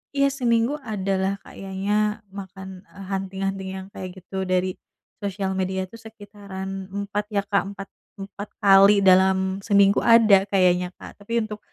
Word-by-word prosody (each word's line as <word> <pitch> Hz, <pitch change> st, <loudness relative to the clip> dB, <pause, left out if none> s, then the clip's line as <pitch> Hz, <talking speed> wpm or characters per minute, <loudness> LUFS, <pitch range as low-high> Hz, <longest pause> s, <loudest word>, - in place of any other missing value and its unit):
iya 275 Hz, 0 st, +3 dB
seminggu 235 Hz, -1 st, +1 dB
ada 200 Hz, -5 st, -3 dB
lah 190 Hz, +1 st, 0 dB
kayaknya 195 Hz, +1 st, -4 dB, 0.4 s
makan, 190 Hz, -1 st, -9 dB
eee, 200 Hz, -, -11 dB
hunting-hunting 195 Hz, 0 st, -3 dB
yang 190 Hz, 0 st, -8 dB
kayak 185 Hz, -, -6 dB
gitu 190 Hz, +1 st, -5 dB
dari 185 Hz, 0 st, +1 dB, 0.5 s
sosial 195 Hz, -1 st, -2 dB
media 190 Hz, 0 st, -2 dB
tuh 230 Hz, +5 st, -14 dB
sekitaran 200 Hz, -3 st, -8 dB
4 200 Hz, +1 st, -3 dB
ya 205 Hz, -2 st, 0 dB
Kak, 200 Hz, -1 st, +1 dB, 0.2 s
empat 195 Hz, 0 st, -7 dB, 0.3 s
empat 200 Hz, +1 st, -8 dB
kali 200 Hz, +1 st, +6 dB
dalam 190 Hz, 0 st, +4 dB
seminggu 200 Hz, -1 st, +4 dB
ada 215 Hz, -4 st, +5 dB
kayaknya, 180 Hz, -2 st, +3 dB
Kak. -, -, -12 dB
Tapi 230 Hz, +3 st, -1 dB
untuk 210 Hz, -1 st, -8 dB
195 Hz, 150 wpm, -23 LUFS, 190-205 Hz, 0.5 s, kali